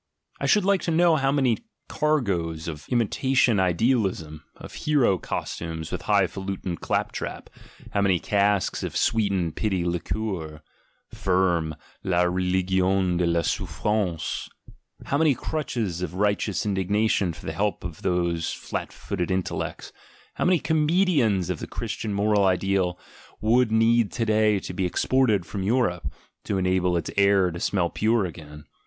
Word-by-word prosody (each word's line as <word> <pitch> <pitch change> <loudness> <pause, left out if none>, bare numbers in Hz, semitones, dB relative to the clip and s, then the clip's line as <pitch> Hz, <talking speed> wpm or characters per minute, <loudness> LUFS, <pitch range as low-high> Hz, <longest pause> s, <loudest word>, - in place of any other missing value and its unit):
I - - -1
should 210 -3 +4
like 200 -1 +3
to - - -3
know 165 0 +4
how 135 -1 +1
many 135 -4 +2 0.3
cargoes 95 - -1
of 75 -3 -7
imitation 125 -1 +2
ideal 105 +5 +2
ism, 80 -4 -8
of - - -11
hero 135 -11 +2
costumes 80 -1 -5
and - - -3
high 100 -2 +3
falutin' 95 -1 -4
clap - - -1
trap, - - -6 0.4
how 100 - +1
many 95 -2 +3
casks 100 -1 +1
of - - -3
sweetened 100 -7 +1
pity 95 -5 -1
liqueur 85 -3 -3 0.5
(Firm: 90 -4 +1 0.3
la 90 -2 +2
religion 95 0 +1
de 90 -1 +1
la 85 0 +2
souffrance), 95 0 -2 0.6
how 140 - 0
many 155 -4 +4
crutches 115 - -3
of 90 - -4
righteous 100 -1 0
indig 95 -2 -1
nation 105 -3 +2
for 80 - -12
the - - -3
help 105 0 -1
of 85 -2 -7
these 85 -2 0
flat - - -5
footed 90 -3 -4
intellects, 95 -1 -3 0.4
how - - -2
many 180 0 +4
comedians 155 - +2
of - - -4
the - - -6
Christian 110 - -4
moral 100 0 +2
ideal 95 -1 +1 0.4
would 115 +1 +3
need 115 0 +3
to 115 - -1
day 110 -1 +3
to 90 - -6
be 90 0 0
exported 110 -1 +2
from 100 0 -5
Europe, 95 - 0 0.3
to 100 - -1
enable 90 -1 +1
its 85 - -3
air 100 -2 +4
to 85 - -6
smell 85 -2 0
pure 110 -1 +1
again. 75 -3 -9
95 Hz, 150 wpm, -25 LUFS, 90-110 Hz, 0.6 s, should